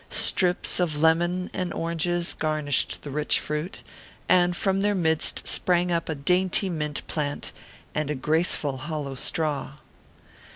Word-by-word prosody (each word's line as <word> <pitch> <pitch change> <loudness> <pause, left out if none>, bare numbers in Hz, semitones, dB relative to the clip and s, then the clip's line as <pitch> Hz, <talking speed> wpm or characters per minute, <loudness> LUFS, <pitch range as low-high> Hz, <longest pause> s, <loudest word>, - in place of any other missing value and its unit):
Strips 180 -1 +2
of 160 -4 0
lemon 175 +3 +2
and 180 -1 -3
oranges 170 +1 -1
garnished 155 -3 0
the 145 - -6
rich 150 +2 +1
fruit, 150 +5 -5 0.4
and 175 -1 +3
from 195 0 +1
their 205 0 +1
midst 160 -4 0
sprang 180 0 +3
up 170 -1 -1
a 160 - -1
dainty 180 +6 +1
mint 150 -3 -3
plant, 145 -3 -3 0.4
and 150 -1 -1
a 150 - -1
graceful 150 -1 +1
hollow 145 0 -5
straw. 150 +2 -1
160 Hz, 135 wpm, -25 LUFS, 150-180 Hz, 0.4 s, and